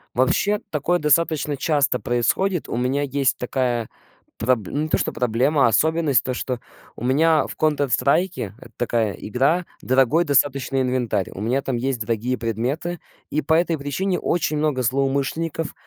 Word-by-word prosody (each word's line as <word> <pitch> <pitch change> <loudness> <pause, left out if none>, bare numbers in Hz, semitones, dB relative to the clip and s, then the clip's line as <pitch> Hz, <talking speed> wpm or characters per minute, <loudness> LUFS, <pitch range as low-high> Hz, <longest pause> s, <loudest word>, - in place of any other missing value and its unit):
Вообще, 205 +11 +2
такое 165 +4 0
достаточно 150 -1 +1
часто 145 -2 +1
происходит. 120 - 0
У - - -2
меня 130 +3 0
есть 140 -1 +1
такая 125 -2 -1 0.5
проб 115 -4 0
ну 145 - -2
не 155 - -3
то - - +2
что - - -1
проблема, 125 +5 +2
особенность, 155 +4 +2
то 130 - -2
что 125 -2 -3 0.4
у - - -9
меня 155 +5 +3
в - - -8
"Контр 150 -3 +1
Страйке", 140 - +1
это - - -14
такая 115 -4 0
игра, 140 - 0 0.2
дорогой 135 +6 +3
достаточно 135 -2 +1
инвентарь, 125 -6 -1
у 95 - -8
меня 125 +6 0
там 130 -3 -2
есть 130 -1 -2
дорогие 115 +3 -1
предметы. 130 - -2 0.3
И 155 - 0
по 160 - 0
этой 165 0 +2
причине 165 +7 -2
очень 165 -3 0
много 150 -4 0
злоумышленников 140 +6 -1
135 Hz, 160 wpm, -22 LUFS, 125-155 Hz, 0.5 s, меня